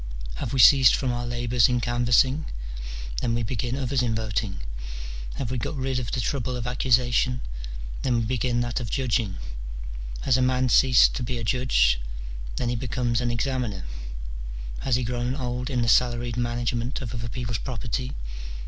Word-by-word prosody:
Have 110 Hz, -, -3 dB
we 135 Hz, -, -1 dB
ceased 130 Hz, 0 st, +8 dB
from 130 Hz, -3 st, 0 dB
our 120 Hz, 0 st, -2 dB
labours 120 Hz, 0 st, +2 dB
in 125 Hz, -1 st, +2 dB
canvassing? 120 Hz, +4 st, +3 dB, 0.8 s
then 115 Hz, -2 st, +1 dB
we 120 Hz, -, 0 dB
begin 120 Hz, +3 st, -2 dB
others 135 Hz, -1 st, 0 dB
in 115 Hz, -2 st, +1 dB
voting. 105 Hz, -, -2 dB, 0.7 s
Have 125 Hz, -3 st, -3 dB
we 130 Hz, -, -1 dB
got 150 Hz, -, -3 dB
rid 130 Hz, -1 st, 0 dB
of 120 Hz, -3 st, -4 dB
the 130 Hz, -, -1 dB
trouble 125 Hz, 0 st, -1 dB
of 120 Hz, -2 st, -3 dB
accusation? 125 Hz, 0 st, +2 dB, 0.6 s
then 125 Hz, -2 st, +1 dB
we 115 Hz, -, +2 dB
begin 120 Hz, 0 st, +1 dB
that 120 Hz, +2 st, -1 dB
of 120 Hz, -3 st, -4 dB
judging. 115 Hz, -7 st, 0 dB, 0.8 s
Has 130 Hz, -2 st, +3 dB
a -, -, +1 dB
man 130 Hz, 0 st, +2 dB
ceased 130 Hz, +1 st, +6 dB
to -, -, -3 dB
be 125 Hz, 0 st, -2 dB
a 115 Hz, -, -4 dB
judge? 105 Hz, -, +3 dB, 0.6 s
then 120 Hz, -, -1 dB
he 120 Hz, -, 0 dB
becomes 125 Hz, -1 st, 0 dB
an 120 Hz, -, 0 dB
examiner. 120 Hz, -5 st, -1 dB, 0.9 s
Has 130 Hz, -, +1 dB
he 125 Hz, -, +1 dB
grown 125 Hz, +2 st, -1 dB
old 125 Hz, -1 st, -3 dB
in 125 Hz, -3 st, +1 dB
the -, -, 0 dB
salaried 120 Hz, 0 st, +3 dB
management 120 Hz, +1 st, -1 dB
of 125 Hz, -3 st, -5 dB
other 115 Hz, 0 st, -4 dB
people's 115 Hz, -3 st, -3 dB
property 125 Hz, +1 st, -3 dB
120 Hz, 175 wpm, -26 LUFS, 115-130 Hz, 0.9 s, ceased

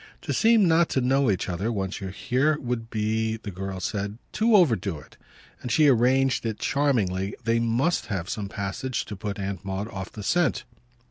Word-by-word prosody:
"To -, -, -2 dB
seem 225 Hz, -3 st, +4 dB
not 165 Hz, 0 st, +4 dB
to -, -, +1 dB
know 135 Hz, +1 st, +2 dB
each 95 Hz, -3 st, 0 dB
other 95 Hz, +6 st, -2 dB
once 95 Hz, -2 st, -3 dB
you're 95 Hz, -, -4 dB
here 130 Hz, +10 st, +1 dB
would 120 Hz, -2 st, -3 dB
be," 110 Hz, 0 st, -1 dB
the 105 Hz, -2 st, -7 dB
girl 95 Hz, 0 st, -5 dB
said, 100 Hz, +2 st, -3 dB
"to 220 Hz, +1 st, +3 dB
overdo 115 Hz, -, +3 dB
it"; -, -, -15 dB, 0.5 s
and 125 Hz, -, -4 dB
she 150 Hz, +6 st, +5 dB
arranged 130 Hz, +2 st, +3 dB
it 110 Hz, -2 st, -2 dB
charmingly 105 Hz, -9 st, 0 dB
that 120 Hz, -, -30 dB
they 115 Hz, 0 st, +2 dB
MUST 120 Hz, +9 st, +1 dB
have 95 Hz, -6 st, -3 dB
some 100 Hz, 0 st, -4 dB
passage 110 Hz, +6 st, -3 dB
to 105 Hz, -, -7 dB
put 100 Hz, 0 st, -5 dB
Aunt 100 Hz, -2 st, -4 dB
Maud 95 Hz, +2 st, -3 dB
off 95 Hz, -2 st, -6 dB
the 105 Hz, -, -8 dB
scent. 175 Hz, -, +1 dB
110 Hz, 195 wpm, -25 LUFS, 100-130 Hz, 0.5 s, she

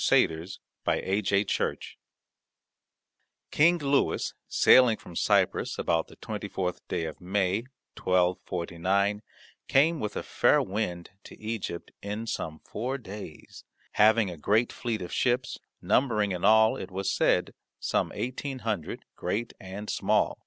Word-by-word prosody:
CHAPTER 80 Hz, +1 st, +3 dB, 0.4 s
XIV 100 Hz, +1 st, +1 dB
SAINT -, -, 0 dB
LOUIS -, -, -3 dB, 1.5 s
King 170 Hz, +4 st, +5 dB
Louis 140 Hz, -3 st, +1 dB
sailing 125 Hz, -4 st, +6 dB
from 85 Hz, -, -13 dB
Cyprus -, -, +1 dB
about 80 Hz, -1 st, 0 dB
the -, -, -15 dB
24th 90 Hz, -1 st, -4 dB
day 80 Hz, -, -2 dB
of 80 Hz, +2 st, -7 dB
May, 95 Hz, +4 st, 0 dB, 0.3 s
1249, 90 Hz, +2 st, 0 dB, 0.5 s
came 155 Hz, +4 st, +3 dB
with 105 Hz, -4 st, -3 dB
a -, -, -3 dB
fair -, -, +3 dB
wind 95 Hz, -4 st, -3 dB
to -, -, -12 dB
Egypt 110 Hz, -6 st, -5 dB
in 105 Hz, +3 st, -4 dB
some 80 Hz, -8 st, -4 dB
four 125 Hz, +5 st, -3 dB
days, 105 Hz, -, -10 dB, 0.3 s
having 105 Hz, -2 st, +4 dB
a 85 Hz, -, -8 dB
great 105 Hz, +10 st, +1 dB
fleet 115 Hz, -5 st, -3 dB
of 90 Hz, -, -7 dB
ships, 125 Hz, 0 st, 0 dB, 0.2 s
numbering 105 Hz, -6 st, +2 dB
in 90 Hz, -1 st, -4 dB
all, 110 Hz, 0 st, +5 dB
it -, -, -6 dB
was 95 Hz, +1 st, -2 dB
said, -, -, +2 dB, 0.3 s
some -, -, 0 dB
eighteen 130 Hz, +5 st, -4 dB
hundred, 105 Hz, -8 st, -3 dB
great 115 Hz, +3 st, -3 dB
and 100 Hz, +2 st, -7 dB
small. -, -, +1 dB
105 Hz, 130 wpm, -28 LUFS, 90-115 Hz, 1.5 s, sailing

